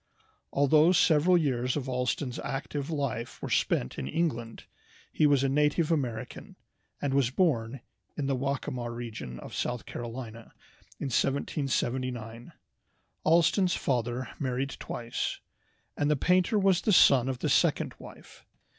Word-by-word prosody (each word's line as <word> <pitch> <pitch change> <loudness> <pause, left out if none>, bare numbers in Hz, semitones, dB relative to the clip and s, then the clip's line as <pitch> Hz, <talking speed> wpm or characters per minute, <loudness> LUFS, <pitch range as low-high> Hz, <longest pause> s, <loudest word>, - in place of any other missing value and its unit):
Although 150 +5 +4
several 170 +1 +4
years 125 -5 0
of 135 -2 -4
Allston's 125 0 -2
active 140 +1 -4
life 135 -7 -3
were - - -6
spent 65 - 0
in 65 - -4
England, 120 - -2 0.5
he 150 - +3
was 140 -2 +3
a - - +3
native 150 +4 +2
American, 125 -6 -3 0.4
and 140 -2 -1
was 135 -3 +3
born 130 -6 0 0.4
in 145 - -1
the 135 0 0
Waccamaw 130 -2 -3
region 115 - -6
of - - -10
South 120 -1 -3
Carolina 115 -1 -7 0.5
in 140 - -3
1779. 125 -4 -1 0.7
Allston's 170 +3 +3
father 120 -1 -1
married 135 0 -2
twice, 120 0 -4 0.6
and 145 - 0
the 150 - +3
painter 180 - +2
was 195 -3 +3
the 210 - +2
son 135 -6 +6
of 130 - -2
the - - -2
second - - +2
wife. - - -13
135 Hz, 135 wpm, -29 LUFS, 120-150 Hz, 0.7 s, son